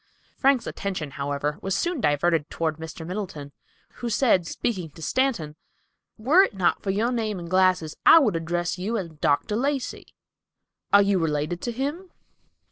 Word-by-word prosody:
Frank's 270 -3 +2
attention 185 -7 -4
was, - - -17
however, 145 +1 -2
soon 335 - -1
diverted 155 -1 +1
toward 160 -2 -2
Mr. 160 0 -8
Middleton, 175 -6 -6 0.5
who 240 - -4
said, 210 -7 +2
speaking 185 -7 -3
to 160 +2 -15
Stanton, 225 - 0 0.6
"Were 275 - +5
it 390 - +1
not 185 -2 +1
for 200 - -4
your 215 +5 +1
name 220 -4 -2
and 170 -1 -7
glasses, 185 -3 +2
I - - +9
would 240 - +3
address 175 +2 -2
you 215 +5 -1
as 185 -5 -4
Dr. 150 +7 0
Lacey. 270 +2 -2 0.8
Are 200 0 +7
you 200 -1 +2
related 155 +2 -1
to 240 - -3
him?" 290 +10 -4
185 Hz, 160 wpm, -25 LUFS, 160-235 Hz, 0.8 s, I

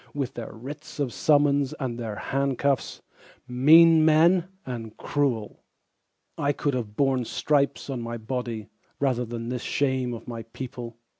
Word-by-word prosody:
With 140 -4 -2
their 115 -2 -7
Writs 140 +7 -9
of 135 -4 -1
Summons 145 -2 +3
and 125 -3 -4
their 110 -3 -4
handcuffs, 135 +1 -1 0.4
Men 160 +6 +7
mean 165 +3 +5 0.2
and 115 -4 -6
cruel. 130 -7 -1 0.8
I 145 0 +1
could 145 0 -1
have 110 -5 -4
borne 135 -1 +2
stripes 140 +3 0
on 130 -4 -4
my 115 0 -4
body 115 -2 -4 0.3
Rather 130 -3 +1
than 115 0 -5
this 125 -1 -3
shame 130 -4 0
of 115 - -11
my 115 -2 -5
people. 115 0 -8
130 Hz, 145 wpm, -26 LUFS, 120-145 Hz, 0.8 s, Men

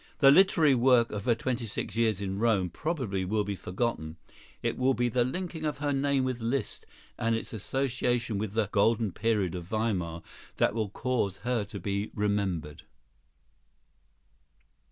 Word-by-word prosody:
The 135 -2 +7
literary 165 -3 +5
work 125 -1 +4
of 105 -1 -5
her 120 - +3
twenty 120 0 -2
six 100 - -4
years 110 -4 +1
in 95 0 -3
Rome 105 -6 +2
probably 125 - -2
will 105 +3 0
be 100 0 -3
forgotten; 90 -5 -3 0.5
it - - 0
will 130 +1 +2
be 120 0 +1
the 120 +1 +2
linking 165 +4 -4
of 150 -1 -1
her 145 0 -1
name 140 -1 +1
with 130 -2 -2
Liszt, 125 +4 -3 0.3
and 115 0 +1
its 115 - -5
association 120 -1 -1
with 105 -1 -3
the 110 -2 +1
"golden 110 0 +2
period" 105 -3 0
of 90 -2 -5
Weimar, 90 -5 -2 0.3
that - - +3
will 110 -2 -1
cause 105 -3 -1
her 120 -3 +1
to 100 0 -8
be 100 +3 -2
remembered. 100 -8 -1
115 Hz, 160 wpm, -29 LUFS, 100-125 Hz, 0.5 s, The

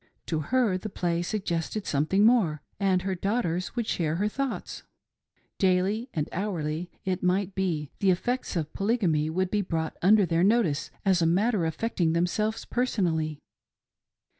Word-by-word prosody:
To 160 - -1
her 210 - +1
the 215 - -5
play 175 -3 -1
suggested 185 +1 -2
something 155 +8 +2
more, 185 -11 +3 0.2
and 190 -2 +2
her 190 0 -1
daughters 185 -2 -1
would 235 -2 -1
share 160 -6 -1
her 200 +5 +1
thoughts. 270 +4 -4 0.8
Daily 195 +6 +1
and 150 -2 -2
hourly, 175 -4 -3 0.2
it 185 -1 -1
might 185 +1 +1
be, 165 -7 -2
the 195 - +3
effects 245 +6 0
of 155 -3 -2
Polygamy 190 -8 +1
would 185 +3 -1
be 210 - +2
brought 160 -4 -2
under 205 +2 +5
their 170 0 +1
notice 200 -8 +2 0.2
as 190 -3 +3
a 165 - +3
matter 190 +1 +2
affecting 165 -1 0
thsmselves 210 +6 0
personally. 170 - 0
185 Hz, 150 wpm, -27 LUFS, 165-210 Hz, 0.8 s, under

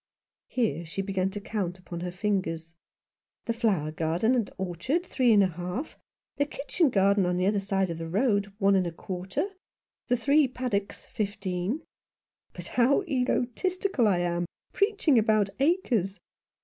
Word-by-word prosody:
Here 225 -9 0
she 170 +4 -4
began 190 -1 0
to 205 +1 -5
count 195 -4 -3
upon 180 -2 -7
her 180 +1 -3
fingers. 180 -4 -2 0.7
"The 230 - 0
flower 200 -10 +1
garden 165 +9 +1
and 235 -5 +1
orchard 190 - -1
three 255 -7 +2
and 205 -2 +6
a 190 - +2
half, 180 - -5 0.4
the 285 - +1
kitchen 295 +2 0
garden 200 -2 +3
on 180 0 0
the 180 - +1
other 205 +1 +2
side 195 -2 0
of 165 - -5
the 165 - -4
road 200 +1 +1
one 200 -2 +4
and 185 -2 +2
a - - -3
quarter, 190 - -3 0.6
the 245 - +2
three 280 +4 +4
paddocks 245 -6 -3
fifteen. 205 - -3 0.7
But - - -9
how 255 +9 +3
egotistical 270 - 0
I 180 -4 +2
am, 175 0 -1 0.3
preaching 400 - +3
about 215 -2 +2
acres. 255 - +1
200 Hz, 155 wpm, -28 LUFS, 180-250 Hz, 0.7 s, and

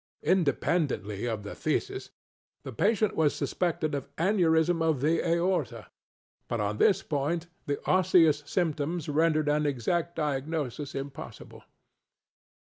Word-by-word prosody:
Independently 145 - 0
of 110 -3 -3
the 105 - -7
phthisis, - - -2 0.5
the 130 - -7
patient 215 - +1
was 155 -2 +2
suspected 165 -4 -1
of 140 -1 -4
aneurism 165 -2 +2
of 160 -4 +2
the 160 +4 +1
aorta; 170 - -1 0.6
but 115 - -2
on 105 0 -2
this 195 -1 +4
point 155 +4 -1 0.2
the 145 -1 -1
osseous 180 -5 +4
symptoms 160 -1 -1
rendered 155 0 +2
an 150 0 +2
exact 165 +6 -1
diagnosis 145 -2 -3
impossible. 135 -4 -8
155 Hz, 120 wpm, -28 LUFS, 140-170 Hz, 0.6 s, this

